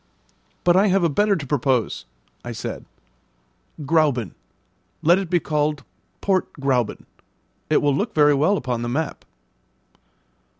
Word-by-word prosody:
"But 175 0 +4
I 195 +3 +4
have 195 -1 +2
a 170 - +3
better 205 +7 +2
to 150 - -5
propose," 130 - 0 0.4
I - - -6
said: - - -6 1.0
"Grauben. 140 - +1 0.7
Let 170 +4 +5
it 190 -4 -5
be 175 -1 +2
called 150 -2 -1 0.4
Port 190 -2 0
Gräuben; 130 -5 -1 0.6
it 155 - +3
will 145 -2 +2
look 210 - -2
very 150 -1 +5
well 155 +9 +2
upon 125 -6 -3
the 120 - -3
map." 150 +5 -3
150 Hz, 135 wpm, -22 LUFS, 135-180 Hz, 1.0 s, Let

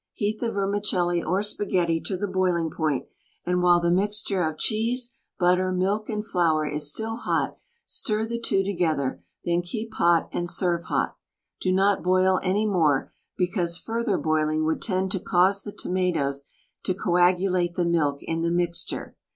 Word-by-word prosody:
Heat 215 0 -2
the 235 -2 -1
vermicelli 195 -4 0
or 190 +4 0
spaghetti 180 -5 0
to 190 - -1
the 205 - -2
boiling 180 -4 0
point; 155 -4 -1 0.4
and 180 0 +1
while 175 -1 +5
the 170 0 +1
mixture 200 +1 0
of 160 -2 -1
cheese, 240 +6 0 0.2
butter, 180 +1 +3
milk 195 +4 0
and 210 -1 -2
flour 165 -6 +2
is 150 0 -1
still 225 +7 -3
hot, - - -1 0.3
stir 215 0 0
the 235 +1 -3
two 195 -4 +1
together, 160 - -1 0.2
then 175 0 +2
keep 220 +5 -6
hot 170 -4 +3
and 175 0 -2
serve 170 -1 0
hot. - - -1 0.4
Do 185 - +1
not 195 +2 +3
boil 185 +1 +3
any 195 +3 +1
more, 160 -9 +2 0.2
because 175 -2 0
further 225 -1 -1
boiling 155 0 +1
would 160 0 0
tend 190 -2 -1
to 190 - -1
cause 190 +3 +3
the 205 - -7
tomatoes 165 -9 -1 0.4
to 185 - -1
coagulate 180 -1 +2
the 175 - +1
milk 150 -5 +1
in 165 0 -2
the 170 - +1
mixture. 175 0 -2
180 Hz, 165 wpm, -25 LUFS, 170-200 Hz, 0.4 s, while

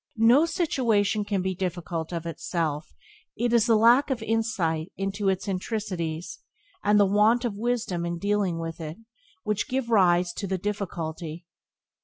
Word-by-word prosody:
No 240 +8 +5
situation 230 - +1
can 200 -2 -1
be 190 0 -1
difficult 175 -3 -4
of 170 -1 -4
itself; 160 -2 -3 0.5
it 240 +1 0
is 235 -1 +4
the 230 - +5
lack 240 +6 +5
of 245 -4 -2
insight 190 -8 -1
into 195 +1 -1
its 190 0 -1
intricacies, 185 -5 -3 0.4
and 210 0 +4
the 205 - +6
want 215 +5 +3
of 235 - -1
wisdom 220 -6 -1
in 170 0 -2
dealing 200 -2 0
with 165 0 -5
it, 155 0 -6 0.5
which 210 -1 -1
give 255 -2 -2
rise 180 -4 +4
to 200 - -3
the 190 0 -1
difficulty. 170 -4 -4
195 Hz, 155 wpm, -26 LUFS, 170-225 Hz, 0.5 s, the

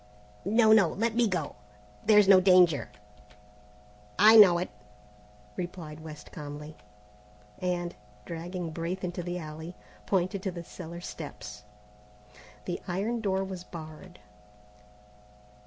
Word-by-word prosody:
"No, 220 +2 +5
no, 205 -5 +6
let 225 +7 -1
me 235 -1 +3
go, 180 -7 -3 0.5
there's 210 -2 +6
no 190 -2 +8
danger." 180 -5 +4 1.3
"I 215 +3 +8
know 195 -6 +9
it," 180 - -3 0.8
replied 170 -4 -6
West 155 -1 -11
calmly; 150 +1 -8 0.8
and, 175 -1 -2 0.3
dragging 170 0 -5
Braith 170 +4 -4
into 180 0 -3
the 175 +1 -4
alley, 160 +1 -8 0.3
pointed 190 +1 0
to 190 - -2
the 170 -1 -7
cellar 170 0 -9
steps. 105 -12 -8 1.0
The 175 - -4
iron 205 +6 -2
door 190 -2 0
was 190 -2 -6
barred. 165 +1 -10
180 Hz, 115 wpm, -28 LUFS, 165-195 Hz, 1.3 s, know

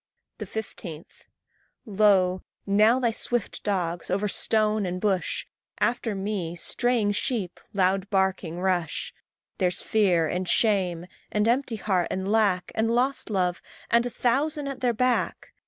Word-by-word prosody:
15. 175 -7 -6 0.8
Lo! 195 -4 +3 0.2
now 215 +5 +4
thy 240 -3 +2
swift 240 0 -2
dogs, 175 -4 -2
over 200 +3 0
stone 215 +1 +1
and 180 -1 -3
bush, 195 -2 0 0.3
After 235 -3 0
me, 190 -4 -3
straying 235 +3 +1
sheep, 205 -3 -2
loud 190 0 +1
barking, 190 -4 0
rush. 180 -3 -1 0.5
There's 180 -2 +1
Fear, 185 -7 +2
and 180 +2 -2
Shame, 185 -6 +1 0.3
and 210 +1 +1
Empty 245 0 +1
heart, 190 -4 0
and 190 +2 -2
Lack, 205 -5 +2
And 220 +1 +1
Lost 250 +3 +1
love, 180 -4 0 0.3
and 235 0 +5
a - - -3
thousand 280 +5 0
at 275 -2 -5
their 245 -2 +2
back! 250 +2 0
205 Hz, 135 wpm, -26 LUFS, 185-230 Hz, 0.8 s, and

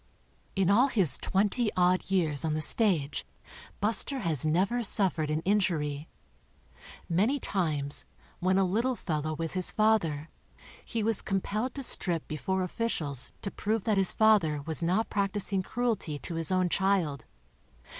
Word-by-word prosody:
In 195 -1 +2
all 240 +7 +5
his 190 - +3
twenty 210 +4 +1
odd 180 +1 +2
years 160 -7 +1
on 155 -1 -1
tVie^stage 155 -3 +2 0.6
Buster 230 +6 -1
has 160 - 0
never 190 +10 +1
suffered 185 -8 +1
an 155 +1 -1
injury. 165 -7 -1 1.0
Many 210 +12 +1
times, 150 - -1 0.3
when 185 +1 +1
a 195 - +3
little 230 +8 0
fellow' 155 -5 -3
with 165 +1 -4
his 185 -1 +5
father, 170 -9 +1 0.5
he 230 -2 -3
was 225 -1 +2
compelled 210 +6 -2
to 275 - -4
strip 175 -9 0
before 190 +5 -2
officials 160 - -3
to 200 - -3
prove 215 0 -2
that 215 -3 +1
his 190 - +4
father 185 -10 +3
was 160 +2 -2
not 185 +7 0
practicing 200 -1 -1
cruelty 215 -8 -2
to 170 - -6
his 165 +1 -1
own 185 -1 +2
child. 175 -8 0
185 Hz, 145 wpm, -28 LUFS, 155-210 Hz, 1.0 s, all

